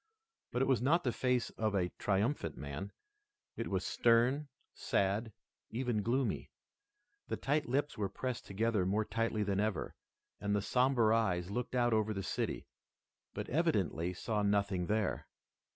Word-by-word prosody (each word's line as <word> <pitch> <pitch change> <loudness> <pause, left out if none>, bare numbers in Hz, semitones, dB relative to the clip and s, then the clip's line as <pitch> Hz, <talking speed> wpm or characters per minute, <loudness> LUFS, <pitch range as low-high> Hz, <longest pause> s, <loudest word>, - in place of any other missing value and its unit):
But 125 - +1
it - - +1
was 130 -5 +3
not 165 +7 +3
the 125 - +1
face 125 0 0
of 110 -2 +1
a 90 -2 +1
triumphant 100 - 0
man. 70 +8 -5 0.6
It - - -3
was - - -1
stern, 120 +5 +3 0.3
sad, 100 +4 0 0.4
even 120 -2 -1
gloomy. 125 +5 0 0.8
The - - -2
thin 150 +2 +1
lips 140 +1 0
were 100 -2 0
pressed 125 -2 -4
together 105 0 +1
more 105 +4 +1
tightly 115 0 0
than 100 -1 0
ever, 105 -5 -1 0.5
and 100 0 0
the 100 - +1
somber 125 -2 +3
eyes 95 -5 +1
looked 125 +3 -3
out 120 -1 +3
over 110 -1 +1
the 95 - -3
city, - - -2 0.7
but - - -3
evidently 85 +3 +1
saw 105 +4 -2
nothing 100 -3 +1
there. 105 -2 0
110 Hz, 150 wpm, -34 LUFS, 100-125 Hz, 0.8 s, was